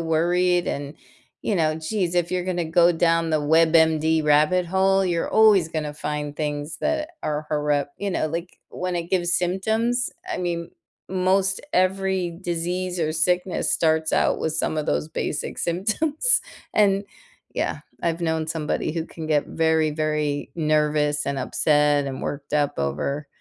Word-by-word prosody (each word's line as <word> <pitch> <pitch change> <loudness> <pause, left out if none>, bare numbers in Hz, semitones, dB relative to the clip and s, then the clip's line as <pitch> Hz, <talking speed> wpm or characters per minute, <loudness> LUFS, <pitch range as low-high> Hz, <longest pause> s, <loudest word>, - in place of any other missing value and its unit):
worried 175 +2 +1
and, 140 +1 -4 0.5
you 205 - 0
know, 155 -2 +2
geez, 175 +2 -2
"If 175 -1 +1
you're 180 -1 -1
gonna 175 -2 -1
go 170 +2 +4
down 165 -1 +2
the 155 -1 +2
WebMD 160 0 +3
rabbit 155 +5 +3
hole, 190 +1 +2
you're 170 -2 0
always 210 -6 +5
gonna 155 -2 -3
find 150 -1 -4
things 150 0 -3
that 310 0 -1
are 150 0 -2
corrupt." 145 -1 -1
Like 170 -3 -2
when 180 0 -3
it 170 +1 -4
gives 175 -2 +1
symptoms, 220 +7 0 0.2
I - - -3
mean, 170 -2 -3 0.4
most 190 +1 +1
every 185 -2 0
disease 180 +1 -2
or 155 -1 0
sickness 180 +3 0
starts 160 -1 +1
out - - +2
with 160 -1 -2
some 155 - -1
of 150 - -2
those 75 +2 0
basic - - -4
symptoms, 295 - +1 0.3
and 200 -1 +3 0.5
yeah, - - -2 0.2
I've 170 0 -1
known 160 -1 -1
somebody 155 -1 -2
who 165 0 -3
can 160 -2 -8
get 150 -2 +1
very, 160 -1 +1
very 150 -1 -1
nervous 150 -2 +1
and 140 -1 -1
upset 145 +1 +2
and 135 -1 -5
worked 145 0 -5
up 145 -1 +1
over 140 - -2
165 Hz, 150 wpm, -23 LUFS, 150-180 Hz, 0.5 s, always